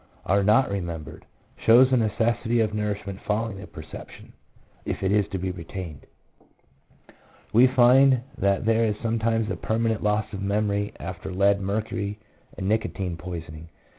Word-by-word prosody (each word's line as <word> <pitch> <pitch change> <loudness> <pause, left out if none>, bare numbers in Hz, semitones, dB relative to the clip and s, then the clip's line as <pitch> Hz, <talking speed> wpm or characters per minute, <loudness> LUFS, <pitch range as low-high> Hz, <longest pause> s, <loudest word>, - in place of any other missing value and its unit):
are 100 +2 +3
not 110 +4 +4
remembered, 85 -5 -5 0.4
shows 125 +3 +6
the - - +5
necessity 115 +1 +1
of 110 -2 +1
nourishment 105 -2 -3
following 105 -1 -1
the 100 - -9
perception, 75 0 -11 0.5
if - - -4
it 95 - +1
is 105 -2 +2
to 95 - -2
be 95 0 -2
retained. 85 -3 -8 1.5
We 120 +4 +7
find 130 +1 +5
that 100 0 +1
there 115 +1 +3
is 110 -2 +1
sometimes 115 -1 0
a - - -1
perman 115 +1 0
ent 110 - -3
loss 105 +1 +1
of 100 - -5
memory 100 0 0
after 90 +1 -6
lead, 100 +2 +2
mercury, 105 +1 -2 0.4
and 95 -1 -3
nicotine 100 -4 -1
poisoning. 80 -2 -8
105 Hz, 150 wpm, -25 LUFS, 95-115 Hz, 1.5 s, We